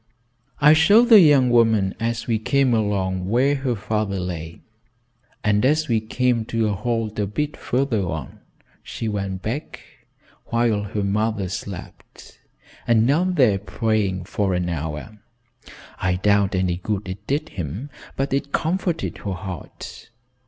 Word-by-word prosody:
"I 150 Hz, +1 st, +7 dB
showed 205 Hz, +10 st, +5 dB
the 220 Hz, -3 st, +10 dB
young 140 Hz, -7 st, +5 dB
woman 110 Hz, -5 st, +3 dB
as 115 Hz, 0 st, -2 dB
we 115 Hz, -3 st, 0 dB
came 135 Hz, +2 st, +2 dB
along 95 Hz, -4 st, -1 dB
where 130 Hz, +6 st, +3 dB
her 135 Hz, -3 st, -1 dB
father 105 Hz, -1 st, -2 dB
lay, 85 Hz, -3 st, -6 dB, 0.8 s
and 105 Hz, -1 st, +2 dB
as 155 Hz, +4 st, +2 dB
we 115 Hz, -2 st, +2 dB
came 120 Hz, +1 st, 0 dB
to 115 Hz, -1 st, 0 dB
a -, -, 0 dB
halt 110 Hz, 0 st, -2 dB
a 105 Hz, -, 0 dB
bit 150 Hz, +9 st, -3 dB
farther 125 Hz, -4 st, -1 dB
on, 80 Hz, -2 st, -6 dB, 0.4 s
she 115 Hz, -, -5 dB
went 100 Hz, -3 st, -3 dB
back, 125 Hz, +8 st, -4 dB, 0.7 s
while 115 Hz, -3 st, +1 dB
her 105 Hz, +1 st, -3 dB
mother 105 Hz, 0 st, 0 dB
slept, 95 Hz, 0 st, -9 dB, 0.5 s
and 115 Hz, -1 st, +4 dB
knelt 175 Hz, +8 st, +2 dB
there 115 Hz, -, +4 dB
praying 100 Hz, -2 st, -1 dB
for 95 Hz, 0 st, -1 dB
an 90 Hz, 0 st, -1 dB
hour. 80 Hz, +6 st, -5 dB, 0.8 s
I 90 Hz, -1 st, +1 dB
doubt 100 Hz, +1 st, +2 dB
any 90 Hz, -2 st, 0 dB
good 100 Hz, +2 st, -3 dB
it 100 Hz, +3 st, -8 dB
did 145 Hz, +3 st, -1 dB
him, 95 Hz, -, -6 dB, 0.2 s
but 135 Hz, 0 st, -2 dB
it 140 Hz, +1 st, -1 dB
comforted 170 Hz, 0 st, -1 dB
her 100 Hz, -, -4 dB
heart. 90 Hz, +3 st, -8 dB
110 Hz, 145 wpm, -22 LUFS, 95-130 Hz, 0.8 s, the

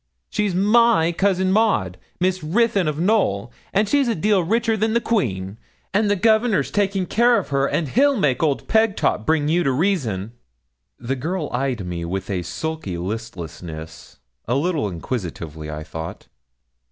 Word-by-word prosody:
'She's 205 Hz, -4 st, 0 dB
my 210 Hz, -3 st, +4 dB
cousin 190 Hz, +1 st, +1 dB
Maud 190 Hz, -, +2 dB, 0.2 s
Miss 185 Hz, -1 st, 0 dB
Ruthyn 200 Hz, +2 st, +2 dB
of 150 Hz, -1 st, -1 dB
Knowl 160 Hz, -, +1 dB, 0.2 s
and 205 Hz, +2 st, +2 dB
she's 280 Hz, +2 st, +2 dB
a 230 Hz, -, +1 dB
deal 205 Hz, +3 st, +2 dB
richer 225 Hz, +5 st, +1 dB
than 220 Hz, +1 st, 0 dB
the 235 Hz, -, +3 dB
Queen; 105 Hz, -, -1 dB, 0.3 s
and 205 Hz, +1 st, +2 dB
the 205 Hz, -, +3 dB
Governor's 220 Hz, +2 st, +2 dB
taking 195 Hz, -2 st, 0 dB
care 235 Hz, +5 st, +3 dB
of 200 Hz, -, -3 dB
her; 140 Hz, -1 st, +1 dB
and 155 Hz, -, -1 dB
he'll 280 Hz, -, +3 dB
make 140 Hz, -10 st, +1 dB
old 150 Hz, -4 st, 0 dB
Pegtop 220 Hz, -, +1 dB
bring 155 Hz, -2 st, +2 dB
you 170 Hz, +3 st, +2 dB
to 135 Hz, -, +2 dB
reason.' 130 Hz, -, 0 dB, 0.7 s
The 125 Hz, +3 st, -3 dB
girl 160 Hz, +4 st, -3 dB
eyed 125 Hz, -5 st, -1 dB
me 85 Hz, -1 st, -4 dB
with 95 Hz, +3 st, -4 dB
a 90 Hz, -2 st, -1 dB
sulky 95 Hz, -, -4 dB
listlessness, 85 Hz, -6 st, -7 dB, 0.3 s
a 120 Hz, -, +1 dB
little 150 Hz, -, 0 dB
inquisitively, 85 Hz, -, -5 dB
I 75 Hz, 0 st, -5 dB
thought. 80 Hz, +1 st, -7 dB
160 Hz, 160 wpm, -22 LUFS, -, 0.7 s, my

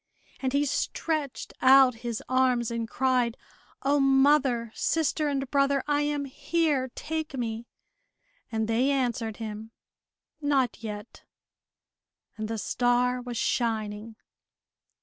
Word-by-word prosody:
And 260 Hz, -1 st, -1 dB
he 285 Hz, +2 st, +2 dB
stretched 295 Hz, 0 st, -2 dB
out 260 Hz, -1 st, +7 dB
his 235 Hz, -2 st, -4 dB
arms 255 Hz, -2 st, +2 dB
and 230 Hz, -1 st, -3 dB
cried, 250 Hz, -2 st, +1 dB, 0.5 s
"O, 285 Hz, +1 st, +3 dB
mother, 270 Hz, -3 st, +3 dB
sister, 310 Hz, -1 st, 0 dB
and 275 Hz, -1 st, -1 dB
brother, 275 Hz, -1 st, +2 dB
I 290 Hz, 0 st, +2 dB
am 290 Hz, -1 st, -1 dB
here! 285 Hz, -1 st, 0 dB
Take 315 Hz, -2 st, -4 dB
me!" 230 Hz, -1 st, -3 dB, 0.8 s
And 220 Hz, -1 st, -1 dB
they 235 Hz, +4 st, +2 dB
answered 240 Hz, -5 st, -1 dB
him, 220 Hz, -1 st, -6 dB, 0.7 s
"Not 275 Hz, -5 st, +1 dB
yet," 210 Hz, 0 st, -7 dB, 1.1 s
and 215 Hz, -1 st, -4 dB
the 225 Hz, 0 st, -3 dB
star 245 Hz, +3 st, +1 dB
was 245 Hz, -1 st, -6 dB
shining. 220 Hz, -2 st, -1 dB
255 Hz, 115 wpm, -27 LUFS, 230-280 Hz, 1.1 s, out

